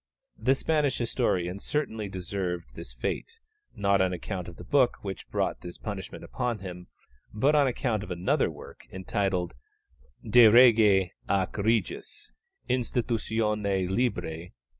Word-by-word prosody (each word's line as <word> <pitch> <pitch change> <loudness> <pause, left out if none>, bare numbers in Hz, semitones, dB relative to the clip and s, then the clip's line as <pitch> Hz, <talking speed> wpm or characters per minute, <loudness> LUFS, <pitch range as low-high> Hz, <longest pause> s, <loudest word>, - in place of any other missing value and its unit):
The 130 +5 +3
Spanish 150 -1 +1
historian 95 -5 -1
certainly 110 -6 -2
deserved 90 -6 -4
this - - -9
fate, 455 - -4 0.4
not 100 -1 +2
on 95 -1 +1
account 90 0 -5
of 85 - -9
the - - -10
book 140 -4 +3
which 95 -2 -6
brought - - -1
this 85 0 -8
punishment 100 -4 -6
upon 125 -2 -2
him, 90 -3 -8 0.5
but 135 +8 +3
on 145 -2 +4
account 120 -4 -1
of 105 - -8
another 90 0 +1
work, - - -12
entitled 95 -1 -1 0.7
_De 115 0 +7
Rege 110 -6 +6 0.2
ac 95 -2 +1
Regis 110 - -1 0.4
institutione 110 -5 0
Libri 115 -4 0
iii. 80 +3 -8
100 Hz, 135 wpm, -28 LUFS, 90-120 Hz, 0.7 s, De